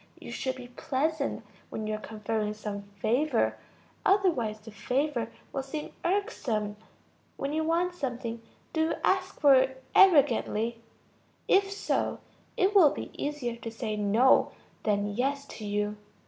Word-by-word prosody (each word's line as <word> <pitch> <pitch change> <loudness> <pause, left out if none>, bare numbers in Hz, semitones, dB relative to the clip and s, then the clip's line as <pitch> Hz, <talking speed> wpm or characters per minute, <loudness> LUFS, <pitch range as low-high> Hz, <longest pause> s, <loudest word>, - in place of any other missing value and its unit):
You - - -9
should 260 -1 -2
be 250 -1 -10
pleasant 280 +4 -1 0.2
when 220 - -4
you 215 - -2
are 215 - -2
conferring 215 0 -3
some 210 -1 -5
favor, 220 +7 0 0.4
otherwise 320 - +2
the 220 +1 -12
favor 250 +3 -1 0.2
will 270 - -1
seem 295 +3 -6
irksome. 290 - -1 0.6
When 275 +1 -2
you 315 +1 +1
want 340 +3 +1
something, 245 -7 -4 0.3
do 320 - +1
you 320 +1 +2
ask 380 0 +1
for 285 -3 +7
it 265 0 +2
arrogantly? 240 - +4 0.7
If 390 0 +4
so, 400 - -1 0.4
it 380 +2 +3
will 365 -8 +8
be - - -6
easier 280 -5 -3
to 235 - -6
say 225 -1 -3
no 210 +5 +4 0.3
than 205 -1 0
yes 280 +4 0
to 215 - -6
you. 210 +1 -1
255 Hz, 145 wpm, -29 LUFS, 215-310 Hz, 0.7 s, will